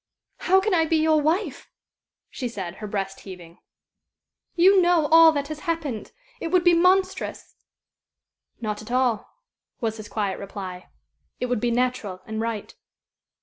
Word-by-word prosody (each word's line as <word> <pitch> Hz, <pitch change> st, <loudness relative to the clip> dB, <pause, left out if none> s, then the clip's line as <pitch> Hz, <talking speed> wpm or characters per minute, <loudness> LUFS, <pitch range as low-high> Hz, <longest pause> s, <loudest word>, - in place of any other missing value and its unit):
"How 380 Hz, +1 st, +3 dB
can 400 Hz, +1 st, 0 dB
I 325 Hz, -2 st, +3 dB
be 325 Hz, -, +2 dB
your 315 Hz, -1 st, +3 dB
wife?" 315 Hz, -1 st, -1 dB, 0.6 s
she 250 Hz, -, -4 dB
said, 190 Hz, -6 st, -6 dB
her 210 Hz, -, -6 dB
breast 195 Hz, -1 st, -4 dB
heaving. 175 Hz, -3 st, -12 dB, 1.0 s
"You 375 Hz, +2 st, +6 dB
know 345 Hz, -3 st, +3 dB
all 325 Hz, 0 st, +8 dB
that 285 Hz, -1 st, -3 dB
has 310 Hz, -1 st, -6 dB
happened. 295 Hz, -10 st, -3 dB, 0.3 s
It -, -, -3 dB
would 360 Hz, +1 st, +2 dB
be 350 Hz, -1 st, +5 dB
monstrous." 370 Hz, +2 st, +1 dB, 1.1 s
"Not 215 Hz, -2 st, -4 dB
at 215 Hz, -, -11 dB
all," 250 Hz, -4 st, +1 dB, 0.5 s
was 225 Hz, -3 st, -2 dB
his 215 Hz, -1 st, -9 dB
quiet 200 Hz, -3 st, -2 dB
reply. 190 Hz, -2 st, -8 dB, 0.5 s
"It -, -, -1 dB
would 245 Hz, -, 0 dB
be 240 Hz, -, +1 dB
natural 235 Hz, -6 st, -1 dB
and 220 Hz, 0 st, -4 dB
right. 225 Hz, -2 st, -4 dB
250 Hz, 150 wpm, -24 LUFS, 210-330 Hz, 1.1 s, all